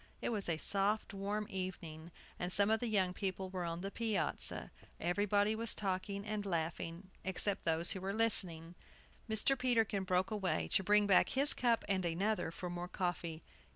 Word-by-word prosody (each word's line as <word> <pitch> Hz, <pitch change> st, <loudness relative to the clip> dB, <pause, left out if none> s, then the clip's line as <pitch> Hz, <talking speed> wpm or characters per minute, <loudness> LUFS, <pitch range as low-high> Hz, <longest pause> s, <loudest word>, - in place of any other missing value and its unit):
It -, -, -2 dB
was 210 Hz, -6 st, -1 dB
a 165 Hz, -, 0 dB
soft, 205 Hz, +7 st, 0 dB
warm 200 Hz, +2 st, -3 dB
evening, 175 Hz, -5 st, -6 dB, 0.3 s
and 175 Hz, +1 st, -2 dB
some 200 Hz, +3 st, +3 dB
of 220 Hz, -, +2 dB
the 240 Hz, -, -2 dB
young 190 Hz, -4 st, +1 dB
people 190 Hz, 0 st, -4 dB
were 180 Hz, -2 st, -3 dB
on 170 Hz, 0 st, -4 dB
the 195 Hz, +1 st, -5 dB
piazza. 220 Hz, -5 st, -1 dB, 0.3 s
Everybody 205 Hz, +4 st, +1 dB
was 230 Hz, +1 st, +3 dB
talking 200 Hz, 0 st, -3 dB
and 210 Hz, -1 st, -3 dB
laughing, 170 Hz, 0 st, -4 dB
except 190 Hz, +1 st, -1 dB
those 165 Hz, +1 st, +2 dB
who 190 Hz, -, -4 dB
were 190 Hz, +1 st, -2 dB
listening. 180 Hz, -7 st, +3 dB, 0.6 s
Mr. 220 Hz, +5 st, +3 dB
Peterkin 225 Hz, -6 st, +1 dB
broke 185 Hz, +1 st, 0 dB
away, 200 Hz, -4 st, -1 dB
to 190 Hz, -, +4 dB
bring 210 Hz, +2 st, +4 dB
back 195 Hz, -2 st, +4 dB
his 280 Hz, +2 st, +7 dB
cup 235 Hz, -2 st, +1 dB
and 190 Hz, -2 st, 0 dB
another 180 Hz, +3 st, -1 dB
for 180 Hz, +2 st, -6 dB
more 175 Hz, 0 st, -5 dB
coffee. 170 Hz, -3 st, -4 dB
195 Hz, 175 wpm, -35 LUFS, 175-210 Hz, 0.6 s, his